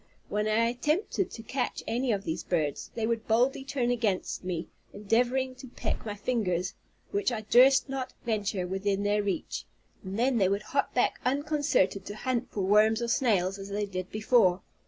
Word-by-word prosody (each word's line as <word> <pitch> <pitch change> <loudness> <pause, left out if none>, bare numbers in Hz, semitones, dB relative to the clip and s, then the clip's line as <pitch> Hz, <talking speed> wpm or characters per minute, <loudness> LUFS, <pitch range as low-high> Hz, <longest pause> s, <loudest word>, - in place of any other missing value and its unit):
When 210 +1 0
I 220 +2 +3
attempted 305 - 0
to 225 - -9
catch 250 +2 -2
any 245 +2 0
of 200 -2 -1
these 160 -1 -3
birds, 155 -5 -1
they 225 -2 -1
would 230 0 -1
boldly 245 +4 +2
turn 265 -3 -1
against 215 -8 -1
me, 175 -2 -3 0.3
endeavoring 245 +5 +1
to 260 - -10
peck 245 - -4
my 205 - -3
fingers, 195 -5 -1 0.4
which 400 -6 +1
I 225 -2 -2
durst 260 +6 +5
not 265 -2 -4
venture 205 -5 -1
within 195 +2 -1
their 205 +1 +2
reach; 195 -5 -3 0.4
and 190 +2 -5
then 245 0 +2
they 190 -2 +4
would 200 +2 -1
hop 280 +5 -1
back 245 - +2
unconcerned, 290 -5 +2
to 205 - -7
hunt 250 +2 -2
for 205 - -3
worms 210 +3 +4
or 235 0 -2
snails, 195 -7 +1
as 195 0 -7
they 205 +1 -1
did 185 -2 -5
before. 215 -4 +3
220 Hz, 180 wpm, -29 LUFS, 195-250 Hz, 0.4 s, durst